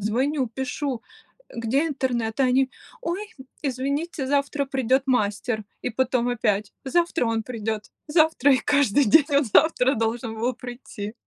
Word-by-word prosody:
звоню, 260 +7 0
пишу, 260 +1 -4 0.5
э: - - -15
"Где 250 +7 +1
интернет?" 250 -6 -2
А - - +5
они: 260 +1 +3 0.3
"Ой, 410 -1 -3 0.4
извините. 280 +2 -2
Завтра 280 +1 0
придёт 265 0 +1
мастер". 215 -2 0 0.2
И 250 - -1
потом 245 0 0
опять: 215 -4 0
"Завтра 335 -2 +1
он 225 -1 0
придёт, 220 -2 -4 0.2
завтра". 310 -3 +4
И 260 - +4
каждый 285 -2 +3
день 275 +7 +6
он 285 0 +4
завтра 265 +2 +4
должен 225 0 -2
был 245 +3 0
прийти. 240 -4 -8
255 Hz, 145 wpm, -24 LUFS, 225-280 Hz, 0.5 s, день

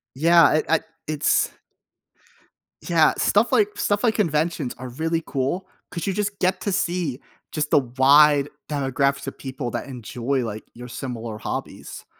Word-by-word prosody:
Yeah, 165 +2 +5
it 155 - +1
I 165 0 +4 0.3
it's 150 -1 +1 1.4
Yeah, 165 -3 +4
stuff 205 +4 +2
like 215 -5 +4
stuff, 205 0 0
like 225 -3 +3
conventions 160 - 0
are 130 0 -6
really 165 +6 -1
cool, 140 +8 -2 0.2
'cause 170 0 -4
you 195 - +1
just 205 0 -2
get 185 +1 +1
to 200 - -1
see, 175 -7 -1 0.3
just 150 -1 -2
the - - +5
wide 140 +3 +5 0.2
demographics 140 -1 0
of - - -6
people 130 -2 -5
that - - -4
enjoy, 125 +1 -3
like, 110 -1 -6
your 120 +1 -10
similar 115 -3 -6
hobbies. - - -6
150 Hz, 155 wpm, -23 LUFS, 130-175 Hz, 1.4 s, Yeah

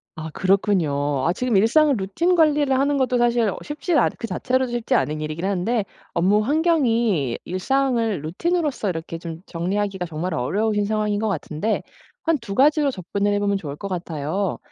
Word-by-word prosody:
아 160 0 -6
그렇군요. 155 -8 +1
아 170 - +3
지금 250 +1 -1
일상을 280 +8 +4
루틴 260 - +1
관리를 295 -5 +3
하는 280 +2 +2
것도 255 -2 +1
사실 240 -1 +2
어 - - -4
쉽지 300 +4 -3
않은 - - +3
그 230 - -4
자체로도 255 +2 0
쉽지 240 +2 -1
않은 155 -8 0
일이긴 155 +3 -4
한데 200 +3 0 0.3
업무 190 +5 +3
환경이 235 - +1
일상을 230 - 0
루틴으로서 285 - -1
이렇게 165 -1 -4
좀 165 0 -7
정리하기가 190 +2 -2
정말 170 +3 -3
어려우신 205 - 0
상황인 210 -1 0
것 220 0 0
같은데 175 +3 -2 0.4
한 325 -2 +2
2 210 -4 -6
가지로 290 +4 +4
접근을 200 0 -2
해보면 205 0 +1
좋을 145 -7 -6
것 200 - -5
같아요. 175 +1 -2
205 Hz, 375 characters per minute, -22 LUFS, 175-255 Hz, 0.4 s, 일상을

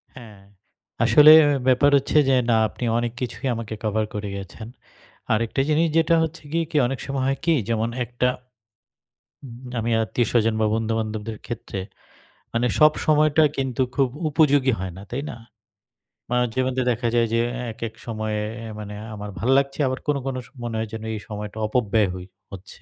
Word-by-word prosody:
হ্যাঁ। 110 -6 -12 0.6
আসলে 145 +7 +8 0.4
ব্যাপার 130 +3 +5
হচ্ছে 140 +3 0
যে, 130 - +4
না 115 - +4
আপনি - - -9
অনেক 120 -1 -1
কিছুই 125 +2 -4
আমাকে 110 -1 -5
কভার 110 0 0
করে 105 -1 -4
গেছেন। 100 +3 -9 0.7
আরেকটা 115 +4 0
জিনিস 160 +2 +3
যেটা 165 +1 +4
হচ্ছে 160 +1 -5
গিয়ে 165 +1 0 0.2
অনেক 135 -1 -4
সময় 135 -1 -2
হয় 135 0 0
কি 170 - +4 0.2
যেমন 115 0 0 0.2
একটা 120 +2 -1 1.5
আমি 115 +1 -1
আত্মীয়স্বজন 115 -1 +1
বা - - +3
বন্ধুবান্ধবদের 110 -1 -3
ক্ষেত্রে, 110 -4 -6 0.7
মানে 120 +1 +1
সব 155 0 +7
সময়টা 155 0 +4
কিন্তু 130 -1 -1
খুব 135 -2 +2 0.2
উপযোগী 145 -4 +3
হয় 95 -2 -4
না, - - -9
তাই 130 +4 -3
না? - - -8 1.0
মানব 125 0 +2
জীবনতে 130 0 0
দেখা 120 +1 -1
যায় 115 -1 +3
যে, 115 - +3 0.3
এক, 110 - -14
এক 110 - -25
সময়ে 110 -2 -3 0.2
এ্যা 115 -1 -7
মানে 105 0 -7 0.2
আমার 105 0 -7
ভাল 115 +8 -1
লাগছে 140 +1 0
আবার 130 +1 -2
কোনো, 145 -2 +1
কোনো 130 -1 -2 0.2
মনে 120 -1 -4
হয় 110 - -2
যেন 110 - -6
এই 110 - -4
সময়টা 105 0 -6
অপব্যয় 110 -3 +1
হই 90 -1 -8 0.3
হচ্ছে। 95 -2 -11
120 Hz, 165 wpm, -23 LUFS, 110-135 Hz, 1.5 s, আসলে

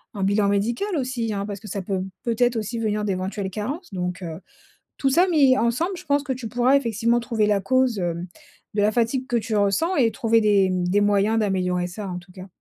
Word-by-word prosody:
un 195 - -2
bilan 200 +1 +2
médical 225 - 0
aussi, 250 -4 -2
hein, 200 -1 -2
parce 205 -2 -6
que 215 - -12
ça 200 -2 -4
peut 190 0 -2 0.2
peut-être 240 +1 +1
aussi 225 +2 -3
venir 210 -1 -1
d'éventuelles 190 0 -3
carences. 250 - -5
Donc, 180 0 -3
heu, 165 -1 -6 0.6
tout 270 - +1
ça 350 +7 +4
mis 275 -7 +5
ensemble, 320 +12 0
je 360 - -11
pense 285 -1 +1
que 265 - -2
tu 245 -3 -5
pourrais 245 +3 +3
effectivement 235 -2 +1
trouver 230 -3 0
la 205 -1 +2
cause, 255 -1 +1
hem, 175 0 -2 0.5
de 205 - +1
la 210 - +4
fatigue 245 +3 0
que 245 - 0
tu 225 0 -2
ressens 205 - +1
et 235 -5 +3
trouver 230 0 +2
des, 200 -3 +3
mmh, 180 -1 -1
des 200 +3 +3
moyens 205 +2 +2
d'améliorer 180 -4 0
ça, 195 +2 -7
en 180 -1 -4
tout 180 +1 -15
cas. 185 0 -10
215 Hz, 225 wpm, -23 LUFS, 195-245 Hz, 0.6 s, mis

